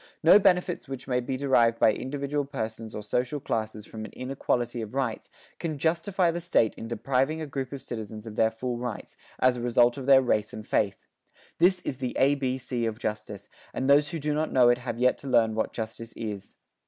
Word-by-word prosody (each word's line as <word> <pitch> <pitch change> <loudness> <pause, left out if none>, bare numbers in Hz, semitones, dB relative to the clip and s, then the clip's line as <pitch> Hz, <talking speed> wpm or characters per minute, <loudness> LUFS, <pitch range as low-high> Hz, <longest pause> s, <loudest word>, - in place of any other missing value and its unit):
No 170 +6 +8
benefits 180 -4 +2
which 135 -1 -7
may 125 -2 +1
be 130 +1 -3
derived 120 -4 +3
by 110 - +5
individual 140 +3 -2
persons 110 -4 -5
or 105 - -5
social 125 +7 -1
classes 110 -4 -3
from 110 -1 -8
an - - -7
inequality 125 -2 -2
of 110 +3 -7
rights 130 -5 -2 0.3
can 155 -3 -3
justify 170 +4 +1
the 175 +1 -4
State 165 -10 +2
in 115 - -8
depriving 135 +6 0
a 160 - -3
group 135 -3 -4
of 140 -2 -7
citizens 110 -1 -7
of 110 -2 -8
their 110 - +3
full 120 +2 -4
rights, 120 -3 -6 0.2
as 130 -1 +3
a - - -5
result 120 +1 +3
of 130 - -7
their 135 -1 +7
race 105 -4 0
and 110 - -7
faith. 100 -2 0 0.5
This 180 +1 +4
is 135 -7 -4
the 125 -2 -3
A 135 +2 +4
B 130 -2 -1
C 120 -2 -2
of 110 -1 -3
justice, 105 -2 -5 0.3
and 130 - -1
those 145 +1 +5
who 165 - -4
do 150 -1 -1
not 155 +1 -1
know 125 -2 +5
it 120 0 +3
have 120 -2 -4
yet 125 +1 +2
to 140 - -9
learn 115 -3 +3
what 110 - -1
justice 115 0 -6
is. 105 -4 -6
125 Hz, 215 wpm, -27 LUFS, 110-140 Hz, 0.5 s, No